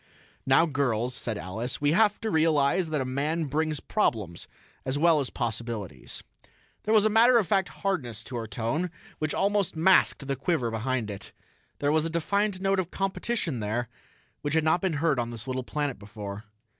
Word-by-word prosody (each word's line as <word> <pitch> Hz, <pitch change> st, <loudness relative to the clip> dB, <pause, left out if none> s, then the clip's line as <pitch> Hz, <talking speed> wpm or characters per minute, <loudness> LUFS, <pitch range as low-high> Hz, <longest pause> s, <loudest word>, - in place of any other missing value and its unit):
"Now, 135 Hz, +5 st, +6 dB
girls," 125 Hz, -6 st, 0 dB
said 115 Hz, -3 st, -3 dB
Alice, 110 Hz, +7 st, -4 dB
"we 145 Hz, 0 st, +2 dB
have 210 Hz, +4 st, +3 dB
to 220 Hz, -1 st, -2 dB
realize 160 Hz, +1 st, +3 dB
that 150 Hz, -3 st, 0 dB
a -, -, -1 dB
man 145 Hz, +6 st, -1 dB
brings 155 Hz, +1 st, -1 dB
problems, 105 Hz, -, -1 dB, 0.4 s
as 130 Hz, +1 st, -1 dB
well 165 Hz, 0 st, +5 dB
as 135 Hz, -, -2 dB
possibilities." 110 Hz, -, -4 dB, 0.6 s
There 215 Hz, -, +2 dB
was 215 Hz, -1 st, +5 dB
a -, -, +6 dB
matter 235 Hz, +3 st, +6 dB
of 220 Hz, -, +3 dB
fact 195 Hz, 0 st, +1 dB
hardness 140 Hz, -, -3 dB
to 130 Hz, -, -8 dB
her 115 Hz, -1 st, -4 dB
tone 115 Hz, -, -1 dB, 0.3 s
which 155 Hz, -1 st, -1 dB
almost 200 Hz, -3 st, +1 dB
masked 165 Hz, -3 st, +4 dB
the 135 Hz, 0 st, -1 dB
quiver 135 Hz, -3 st, 0 dB
behind 115 Hz, -1 st, -1 dB
it. 100 Hz, -, -9 dB, 0.4 s
There 145 Hz, 0 st, +1 dB
was 155 Hz, +1 st, +2 dB
a -, -, -3 dB
defiant 200 Hz, +4 st, 0 dB
note 195 Hz, 0 st, +1 dB
of 180 Hz, -2 st, -2 dB
competition 195 Hz, -, -2 dB
there 110 Hz, +3 st, -2 dB, 0.5 s
which 145 Hz, +1 st, -1 dB
had 160 Hz, -, +3 dB
not 160 Hz, +3 st, +3 dB
been 190 Hz, -3 st, 0 dB
heard 150 Hz, -2 st, +1 dB
on 120 Hz, -1 st, -1 dB
this 115 Hz, -2 st, -6 dB
little 130 Hz, -1 st, -2 dB
planet 145 Hz, +1 st, -3 dB
before. 100 Hz, 0 st, -8 dB
145 Hz, 185 wpm, -27 LUFS, 120-175 Hz, 0.6 s, Now